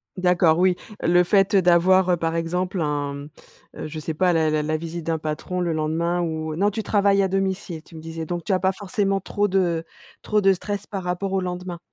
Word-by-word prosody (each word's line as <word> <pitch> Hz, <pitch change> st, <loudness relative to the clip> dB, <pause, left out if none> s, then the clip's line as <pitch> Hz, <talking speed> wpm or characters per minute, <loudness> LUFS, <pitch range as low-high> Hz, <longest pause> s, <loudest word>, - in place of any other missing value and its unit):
D'accord, 180 Hz, -3 st, +3 dB
oui, 185 Hz, 0 st, +3 dB, 0.3 s
le 175 Hz, +1 st, +4 dB
fait 195 Hz, +2 st, +3 dB
d'avoir, 185 Hz, 0 st, +4 dB
heu, 175 Hz, -, +3 dB
par 165 Hz, 0 st, -1 dB
exemple, 180 Hz, +2 st, -1 dB
un, 145 Hz, -2 st, -1 dB
mmh, 140 Hz, +1 st, -8 dB, 0.5 s
heu, 155 Hz, -, -5 dB
je 155 Hz, 0 st, -6 dB
sais 155 Hz, 0 st, -4 dB
pas 180 Hz, +1 st, +2 dB
la 160 Hz, -1 st, +2 dB
la 155 Hz, 0 st, 0 dB
la 155 Hz, +1 st, -1 dB
visite 165 Hz, 0 st, -6 dB
d'un 165 Hz, -1 st, -1 dB
patron 155 Hz, +4 st, -4 dB
le 170 Hz, -2 st, 0 dB
lendemain 165 Hz, +3 st, 0 dB
ou 160 Hz, -2 st, -3 dB
non, 200 Hz, +5 st, +2 dB
tu 220 Hz, -, -3 dB
travailles 200 Hz, -2 st, +2 dB
à 195 Hz, -, +2 dB
domicile 190 Hz, -3 st, -2 dB
tu 165 Hz, -, -16 dB
me 160 Hz, -, -8 dB
disais, 165 Hz, 0 st, -6 dB
donc 175 Hz, 0 st, -4 dB
tu -, -, -3 dB
as 185 Hz, -, +4 dB
pas 190 Hz, 0 st, +2 dB
forcément 195 Hz, 0 st, -1 dB
trop 205 Hz, +2 st, -1 dB
de 180 Hz, -4 st, +1 dB, 0.4 s
trop 210 Hz, -1 st, +1 dB
de 195 Hz, -1 st, +5 dB
stress 205 Hz, +2 st, -5 dB
par 195 Hz, -3 st, -5 dB
rapport 180 Hz, +2 st, -2 dB
au 190 Hz, -, +1 dB
lendemain? 180 Hz, -1 st, -5 dB
175 Hz, 225 wpm, -23 LUFS, 160-190 Hz, 0.5 s, de